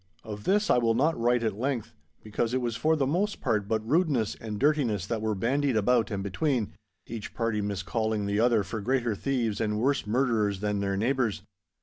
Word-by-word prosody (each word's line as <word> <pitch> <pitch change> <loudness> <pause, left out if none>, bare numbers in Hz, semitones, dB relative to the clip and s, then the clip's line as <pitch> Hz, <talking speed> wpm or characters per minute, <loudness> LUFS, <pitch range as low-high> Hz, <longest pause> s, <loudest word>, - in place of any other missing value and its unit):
Of 105 -1 -8
this 210 +2 +2
I - - +5
will 115 -1 +2
not 150 +7 +2
write 120 +1 +1
at 110 -3 0
length, 130 -3 -2 0.3
because 115 +3 -1
it - - +3
was 120 -3 -2
for 160 +6 +2
the 140 -3 +1
most 190 +9 0
part 105 -6 0
but 110 0 -1
rudeness 145 - +2
and 110 -2 -6
dirtiness 130 - +1
that 110 +1 -2
were 110 -1 0
bandied 130 +4 +1
about 115 +2 +2
and 100 -3 -3
between—each 105 - -4
party 115 -3 0
miscalling 105 +2 -1
the 100 +1 0
other 115 -2 +3
for 105 +4 -5
greater 120 0 0
thieves 115 -2 -1
and 105 -1 0
worse 135 -2 +1
murderers 110 -4 +1
than 105 0 -1
their 100 -1 -1
neighbours. 115 -5 0
115 Hz, 195 wpm, -28 LUFS, 105-130 Hz, 0.3 s, I